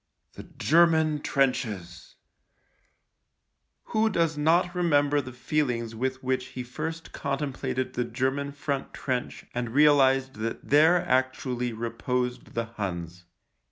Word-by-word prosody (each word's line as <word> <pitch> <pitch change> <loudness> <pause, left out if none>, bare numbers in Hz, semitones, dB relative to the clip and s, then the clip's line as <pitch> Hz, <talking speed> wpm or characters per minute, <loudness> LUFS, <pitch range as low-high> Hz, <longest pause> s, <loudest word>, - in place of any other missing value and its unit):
The - - -11
German 160 -2 +4
trenches! 110 -12 -1 1.7
Who 220 0 +1
does 165 -5 +1
not 170 +4 +2
remember 145 -5 +2
the 130 -1 -9
feelings 125 -3 -1
with 130 +3 -3
which 130 0 -1
he 125 - -2
first 160 +6 -6
contemplated 135 -2 -3
the 125 - 0
German 135 +3 -1
front 140 -1 -4
trench 125 -2 -3
and 120 -1 -2
realised 135 -4 +4
that 115 +1 -4
there 160 +5 +5
actually 130 -1 0
reposed 120 +2 -3
the 115 0 0
Huns 90 -6 -6
130 Hz, 115 wpm, -27 LUFS, 125-150 Hz, 1.7 s, there